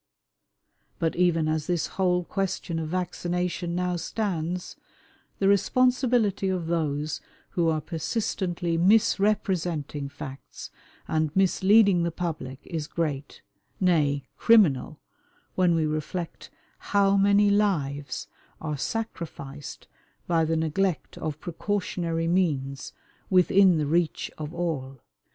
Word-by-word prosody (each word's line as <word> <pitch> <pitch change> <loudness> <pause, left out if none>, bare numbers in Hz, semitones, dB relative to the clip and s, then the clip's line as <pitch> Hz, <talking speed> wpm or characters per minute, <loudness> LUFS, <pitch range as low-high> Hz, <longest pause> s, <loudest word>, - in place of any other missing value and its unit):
But 165 -1 0
even 170 -3 +2
as 155 -1 -1
this 175 -3 0
whole 180 -2 0
question 180 -3 -2
of 160 -1 -4
vaccination 180 0 -2
now 180 0 0
stands, 180 -2 -3 0.6
the 195 - +1
responsibility 235 -1 +2
of 185 -3 -1
those 155 -3 -1 0.3
who 170 -2 +1
are 155 -1 0
persistently 175 +1 -2
misrepresenting 180 -7 +1
facts 135 -1 -9 0.4
and 155 -1 +1
misleading 195 0 +4
the 170 - +1
public 160 -6 -5
is 160 -3 -4
great, 150 -5 -3 0.4
nay, 150 -6 +2 0.2
criminal, 160 - +4 0.5
when 180 -2 +3
we 160 -1 +1
reflect 155 +3 -4 0.3
how 200 -1 +2
many 200 +1 +4
lives 145 -10 0 0.3
are 150 -2 -3
sacrificed 150 - -5 0.4
by 165 -2 +2
the 160 +1 0
neglect 160 +2 -1
of 155 -1 -4
precautionary 175 -2 -2
means 145 -7 0 0.4
within 185 -1 +5
the 150 - 0
reach 165 +2 0
of 150 0 -5
all. 150 -7 -3
170 Hz, 110 wpm, -26 LUFS, 155-190 Hz, 0.6 s, within